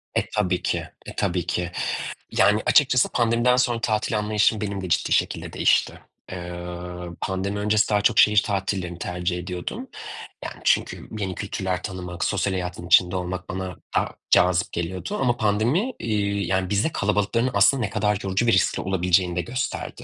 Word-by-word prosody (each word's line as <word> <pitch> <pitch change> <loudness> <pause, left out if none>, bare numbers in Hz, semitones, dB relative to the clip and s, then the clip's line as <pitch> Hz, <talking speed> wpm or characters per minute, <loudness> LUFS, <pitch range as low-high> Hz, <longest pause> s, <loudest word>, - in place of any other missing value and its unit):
E, - - +4
tabii 90 -4 +1
ki. 90 - 0 0.3
E, - - -9
tabii 85 -1 0
ki. 90 -1 -2 0.6
Yani, 105 +1 +4
açıkçası 125 -4 +4
pandemiden 120 +1 +3
sonra 120 -2 +1
tatil 110 0 0
anlayışım, 105 +1 +2
benim 100 -2 -3
de 90 - -5
ciddi - - +1
şekilde - - 0
değişti. - - +2 0.3
Eee, 90 -1 -6 0.7
pandemi 95 +2 -2
öncesi 105 +1 +2
daha 105 -1 +2
çok 115 0 +3
şehir 105 -1 +6
tatillerini 95 -3 -2
tercih 90 0 -2
ediyordum. 90 0 -5 0.6
Yani, - - -6
çünkü - - 0
yeni 95 -3 -3
kültürler 95 -2 -3
tanımak, 90 -3 -5
sosyal 100 - 0
hayatın 90 -1 -4
içinde 90 0 +5
olmak, 90 0 -4
bana 95 -1 -4 0.2
daha - - +2 0.2
cazip 90 0 +4
geliyordu 85 +1 -3
ama 120 -2 +2
pandemi, 115 - +1
iii, 100 -4 -1
yani, 95 0 0
bize 105 +9 +1
kalabalıkların 105 +1 0
aslında 135 -2 +4
ne 105 - -1
kadar 105 0 +1
yorucu 95 +4 0
ve - - +5
riskli 95 -5 +2
olabileceğini 90 -1 +1
de 90 - +1
gösterdi. 125 +8 -4
100 Hz, 160 wpm, -24 LUFS, 90-105 Hz, 0.7 s, şehir